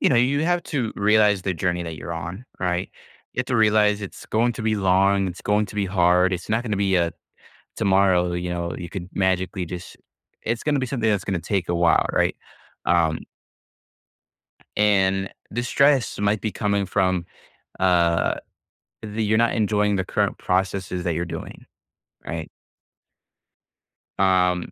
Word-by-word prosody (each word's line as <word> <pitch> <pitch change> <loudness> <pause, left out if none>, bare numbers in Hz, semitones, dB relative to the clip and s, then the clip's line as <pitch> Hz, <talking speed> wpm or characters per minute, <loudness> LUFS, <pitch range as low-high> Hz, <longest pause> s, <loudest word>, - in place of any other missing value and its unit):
you - - +4
know, 125 - +3
you 140 +5 +2
have 175 0 +1
to 125 -7 -2
realize 105 -1 +3
the 95 0 -1
journey 90 0 -1
that 80 -2 -6
you're 85 - -6
on, 85 +7 -6 0.2
right? 90 -1 -1 0.4
You - - 0
have - - -3
to 125 - 0
realize 105 -1 +3
it's 100 - -8
going 120 +2 +1
to 115 - -6
be 110 0 +1
long, 95 0 +3
it's 90 +1 -8
going 105 +1 +1
to 95 - -12
be 100 -1 0
hard, 90 0 +3
it's 90 -1 -4
not 115 +2 +1
gonna 105 -4 -1
be, 95 -1 +2
uh, 85 -1 +1 0.7
tomorrow, 95 -2 +3
you 90 0 -3
know, 85 -2 -3
you 85 - -6
could 90 0 -6
magically 95 0 0
just 90 +1 -8 0.5
it's 115 +1 -2
gonna 150 -2 +1
be 130 - -1
something 120 -4 0
that's 100 -2 0
gonna 95 -3 -2
take 90 +1 -2
a 85 - 0
while, 85 0 +3
right? - - +1 0.5
Um 80 -2 +2 1.6
and 95 -2 +2 0.2
the 120 +3 -2
stress 140 0 +2
might 105 +1 +1
be 110 - -2
coming 100 -2 0
from, 95 -2 0 0.6
uh, 85 -2 +3 0.7
the 110 +1 -3
you're 110 +1 +2
not 115 0 +2
enjoying 105 -2 +1
the 95 - -1
current - - -1
processes 95 -1 -1
that 85 -3 0
you're 85 - -1
doing, 85 - -8 0.6
right? 80 -1 -5 1.7
Um, 90 -2 +2
95 Hz, 170 wpm, -23 LUFS, 90-105 Hz, 1.7 s, you